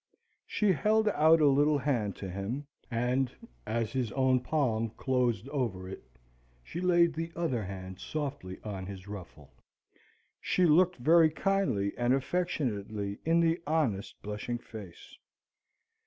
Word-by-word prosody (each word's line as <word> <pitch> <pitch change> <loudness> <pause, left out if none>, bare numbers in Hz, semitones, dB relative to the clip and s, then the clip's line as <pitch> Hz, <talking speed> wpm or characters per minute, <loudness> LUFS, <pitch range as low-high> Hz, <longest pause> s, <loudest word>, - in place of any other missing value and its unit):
She 210 -2 +2
held 215 +4 +2
out 160 -3 +5
a 150 - +6
little 145 +2 +4
hand 120 -9 -1
to 100 - -6
him, 100 +10 -4 0.2
and, 125 +2 0 0.4
as 115 0 -1
his 125 -5 -1
own 130 -1 +3
palm 125 -5 0
closed 125 -4 0
over 115 -10 -2
it, 95 - -7 0.6
she 170 - -6
laid 175 -2 +4
the 165 +1 -4
other 150 -10 -1
hand 95 -1 -7
softly 140 -11 -5
on 95 -3 -5
his 95 -1 -8
ruffle. 90 -8 -10 0.9
She 185 - +2
looked 175 +3 +5
very 160 +5 +5
kindly 160 - 0
and 120 +2 +3
affectionately 110 - -2
in 165 +1 +4
the 165 0 +2
honest 145 -11 0
blushing 105 +3 -3
face. 105 -7 -11
130 Hz, 135 wpm, -30 LUFS, 105-160 Hz, 0.9 s, a